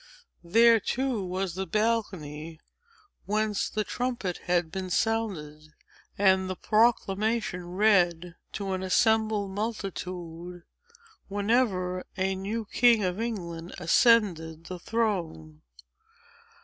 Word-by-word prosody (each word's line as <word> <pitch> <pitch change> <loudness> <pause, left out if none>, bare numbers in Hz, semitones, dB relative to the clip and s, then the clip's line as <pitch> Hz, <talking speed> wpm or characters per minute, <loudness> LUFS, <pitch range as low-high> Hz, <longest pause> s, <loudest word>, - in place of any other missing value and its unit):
There, 230 +6 +5
too, 250 -1 -1
was 185 0 -3
the 190 +1 -4
balcony 165 -7 -2 0.7
whence 210 0 0
the 215 - -1
trumpet 240 -7 -3
had 175 -2 +1
been 190 0 -4
sounded, 175 -9 -1 0.5
and 190 -1 +3
the 185 - -2
proclamation 215 -3 +1
read 180 -4 +3 0.2
to 195 -1 -3
an 185 - -2
assembled 215 +1 +2
multitude, 180 -5 -5 0.6
whenever 200 -3 0
a 190 0 +1
new 205 +4 -4
king 230 0 +4
of 185 +3 -1
England 175 -7 -5
ascended 170 -4 +3
the 180 0 -7
throne. 170 - -2
190 Hz, 100 wpm, -27 LUFS, 175-220 Hz, 0.7 s, There